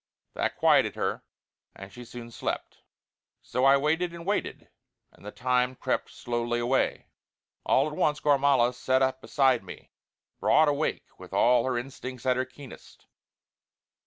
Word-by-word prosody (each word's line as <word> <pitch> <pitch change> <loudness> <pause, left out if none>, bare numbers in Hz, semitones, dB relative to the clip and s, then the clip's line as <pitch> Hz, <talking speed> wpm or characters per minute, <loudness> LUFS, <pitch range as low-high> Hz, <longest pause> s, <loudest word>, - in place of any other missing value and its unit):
That - - -2
quieted - - +3
her, - - -2 0.5
and 95 0 -11
she 125 - -10
soon 120 0 -10
slept. - - -5 0.6
So 125 +2 -1
I 135 0 +6
waited 165 +5 0
and 170 0 -9
waited, 205 +2 -2 0.4
and - - -21
the 105 - -7
time 125 +1 0
crept - - -2
slowly 120 0 -3
away. 120 +3 0 0.6
All - - +3
at 150 - -6
once 150 0 +1
Gormala 140 -4 +3
sat 130 +1 +1
up 130 0 -1
beside 130 -7 +2
me, 95 - -12 0.5
broad 155 +1 +4
awake 145 +1 -1
and - - -33
with - - -12
all 120 0 +4
her 130 -2 -1
instincts 130 -1 -7
at 130 -1 +3
her 130 +1 -1
keenest. 130 +1 -14
130 Hz, 155 wpm, -27 LUFS, 120-140 Hz, 0.6 s, I